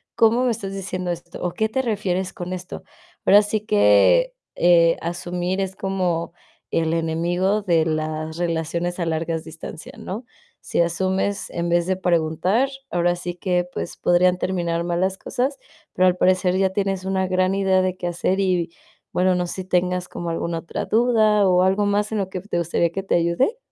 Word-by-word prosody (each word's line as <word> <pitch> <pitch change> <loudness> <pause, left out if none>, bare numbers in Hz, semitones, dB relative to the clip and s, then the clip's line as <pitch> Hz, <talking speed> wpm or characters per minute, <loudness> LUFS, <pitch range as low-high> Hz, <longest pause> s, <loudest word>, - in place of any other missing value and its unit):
¿cómo 230 +3 +4
me 250 - +2
estás 195 -3 -4
diciendo 185 -2 -3
esto? 175 0 -7
¿O 180 - 0
qué 220 0 0
te 265 +3 0
refieres 190 -4 -1
con 180 0 -6
esto?". 180 0 -6 0.4
Ahora 205 +1 +7
sí 210 0 -1
que, 105 - +4 0.2
eh, 170 -1 +4
asumir 175 +2 -2
es 190 0 -3
como 180 -4 -1 0.4
el 165 0 +1
enemigo 175 +5 0
de 170 -5 +2
las 155 0 -2
relaciones 170 +1 -2
a 170 - 0
largas 165 0 -2
distancias, 160 0 -9
¿no? 220 +6 -6 0.3
Si - - -1
asumes 190 +4 -1
en 170 0 -2
vez 170 0 +2
de 190 - +1
preguntar, 180 - +1 0.2
ahora 175 0 +1
sí 175 0 -5
que, 180 0 0
pues, - - -5
podrían 180 +1 +3
terminar 170 -2 -1
mal 175 0 -1
las 190 +1 0
cosas, 265 +3 -2 0.4
pero 185 0 +3
al 180 0 +2
parecer 185 0 +2
ya 190 -1 +2
tienes 195 -1 -1
una 190 0 0
gran 185 +1 +1
idea 190 -1 +3
de 185 0 -1
qué 175 -1 -4
hacer 185 +3 0
y 180 -3 0 0.4
bueno, 185 0 +3
no 180 -1 -1
sé - - -5
si 190 - -5
tengas 180 0 0
como 170 -1 -5
alguna 165 0 -2
otra 165 - -5
duda 215 -3 +3
o 180 0 +4
algo 195 +2 +2
más 205 +1 0
en 220 - -1
lo 190 -2 -2
que 185 - -5
te 195 -3 -3
gustaría 170 0 +1
que 195 - -3
te - - 0
ayude. 170 - +1
180 Hz, 185 wpm, -22 LUFS, 170-195 Hz, 0.4 s, Ahora